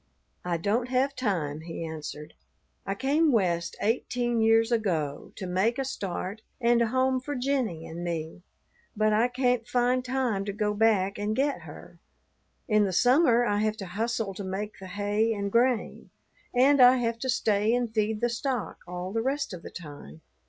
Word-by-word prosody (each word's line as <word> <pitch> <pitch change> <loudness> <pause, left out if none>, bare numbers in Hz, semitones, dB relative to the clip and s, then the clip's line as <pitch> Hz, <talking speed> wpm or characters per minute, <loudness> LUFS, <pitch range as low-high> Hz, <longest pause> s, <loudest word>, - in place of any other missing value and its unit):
"I 175 -1 -1
don't 220 +8 0
have 265 +2 +1
time," 165 - -2
he 165 0 -6
answered. 155 -1 -7 0.5
"I 195 - -1
came 290 +7 +2
West 175 -7 0
eighteen 240 +1 0
years 225 +1 +4
ago 170 -11 -1
to 190 - -6
make 190 +6 +1
a 270 - -1
start 200 -4 -4 0.2
and 235 -1 +3
a 235 - +3
home 260 +2 +1
for 290 +3 -5
Jennie 250 - -1
and 170 +2 -7
me, 165 0 -4 0.6
but 215 0 +3
I 225 +3 +3
can't 250 -2 0
find 245 +1 +1
time 250 -6 -1
to 200 - -3
go 210 0 0
back 205 -3 +2
and 210 +1 -1
get 280 +2 0
her. - - -12 0.7
In 215 -2 +4
the 190 - -1
summer 245 - +4
I 205 -3 +1
have 215 0 0
to 195 - -6
hustle 225 +2 -2
to 200 - -6
make 195 +3 -5
the 190 - -9
hay 205 +3 0
and 200 -1 -3
grain, 240 0 +1 0.4
and 265 +2 +4
I 250 +1 +8
have 230 -2 -1
to 260 - -3
stay 215 -2 +2
and 245 -1 0
feed 215 -1 0
the 240 - +2
stock 245 -1 -3
all 180 +1 -5
the 225 - 0
rest 275 -1 -2
of 175 - -7
the - - -9
time." 145 - -10
220 Hz, 180 wpm, -27 LUFS, 190-245 Hz, 0.7 s, I